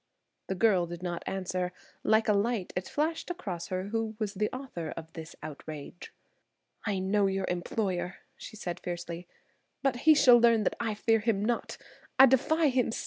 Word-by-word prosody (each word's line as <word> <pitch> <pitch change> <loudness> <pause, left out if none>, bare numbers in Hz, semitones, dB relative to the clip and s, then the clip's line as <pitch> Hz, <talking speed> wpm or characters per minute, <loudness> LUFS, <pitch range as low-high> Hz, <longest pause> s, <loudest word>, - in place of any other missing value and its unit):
The 190 - -2
girl 190 -4 +3
did 175 +1 -8
not 175 -1 -3
answer. 185 -1 -2 0.3
Like 220 0 +3
a 210 - +4
light 205 -1 0
it 180 +1 -2
flashed 320 +4 -1
across 190 - -4
her 185 +1 -3
who 225 0 -2
was 215 -3 -2
the 210 +1 0
author 255 - -6
of 160 0 -8
this 160 -1 -8
outrage. 155 +2 -8 0.8
"I 200 -1 0
know 195 +2 +2
your 195 0 -1
employer!" 180 0 -2 0.2
she - - -10
said 180 -4 -5
fiercely. 175 0 -5 0.6
"But 270 -3 +2
he 310 +5 +6
shall 250 -4 +7
learn 230 -2 +5
that - - 0
I 225 -2 -1
fear 225 +1 +2
him 210 -2 0
not. 240 0 -1 0.4
I 265 - +10
defy 285 +5 +3
him 250 -3 +1
still." - - -3
205 Hz, 180 wpm, -29 LUFS, 180-235 Hz, 0.8 s, I